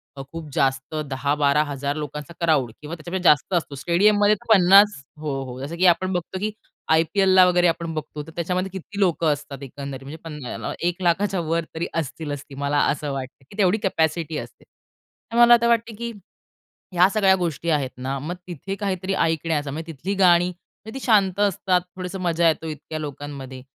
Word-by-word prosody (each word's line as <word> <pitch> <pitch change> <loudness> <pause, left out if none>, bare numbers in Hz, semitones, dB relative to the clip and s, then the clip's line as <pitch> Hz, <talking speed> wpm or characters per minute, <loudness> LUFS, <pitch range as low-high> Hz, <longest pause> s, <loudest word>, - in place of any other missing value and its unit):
अ, 135 - -7
खूप 165 -2 -7
जास्त 135 +2 0
10000-12000 140 +1 0
लोकांचा 150 +1 -6
क्राउड 140 -8 +2
किंवा 155 +3 -6
त्याच्यापेक्षा 175 +2 0
जास्त 150 +6 +3
असतो. 160 -5 -1
स्टेडियममध्ये 205 +7 +3
तर 220 +2 +2
50 195 -2 +6 0.2
हो, 140 -3 -3
हो 125 0 -8
जसं 145 +5 -5
की 185 - +2
आपण 185 +2 +3
बघतो 180 +2 -3
की 215 +2 -1 0.4
आय-पी-एलला 185 +3 +5
वगैरे 175 -1 +4
आपण 165 0 -1
बघतो, 150 -1 -5
तर - - -10
त्याच्यामध्ये 180 +2 -1
किती 195 +2 -8
लोकं 170 -4 +2
असतात 145 -1 -8
एकंदरीत, 135 0 -7
म्हणजे 145 +4 -8
पण 150 -2 -7
याला - - -4
1 175 +2 -2
लाखाच्या 190 +2 +1
वर 165 +1 -1
तरी 165 +1 -2
असतीलच 145 -2 -3
ती, 135 - -10
मला 140 +1 -1
असं 145 0 -3
वाटतं 135 0 -7
की 200 - -14
तेवढी 200 +1 +3
कॅपॅसिटी 160 -4 0
असते. - - -9 0.7
तर 235 - -2
मला 240 0 +8
आता 235 0 +4
वाटते 230 -1 +1
की 235 +2 -5 0.8
ह्या 180 +1 +6
सगळ्या 195 -3 +4
गोष्टी 170 -2 -2
आहेत 145 -5 +1
ना, 130 +2 -3
मग 160 +6 -4
तिथे 180 +3 -5
काहीतरी 195 -2 -2
ऐकण्याचा 160 -4 0
म्हणजे 165 +3 -6
तिथली 170 +7 -4
गाणी 180 -2 +5
म्हणजे 220 +7 -11
ती - - -8
शांत 200 -5 +3
असतात. 190 -2 +2
थोडंसं 185 +1 -5
मजा 170 -1 +2
येतो 160 0 0
इतक्या 155 +1 -6
लोकांमध्ये. 140 -3 -7
165 Hz, 180 wpm, -23 LUFS, 145-190 Hz, 0.8 s, मला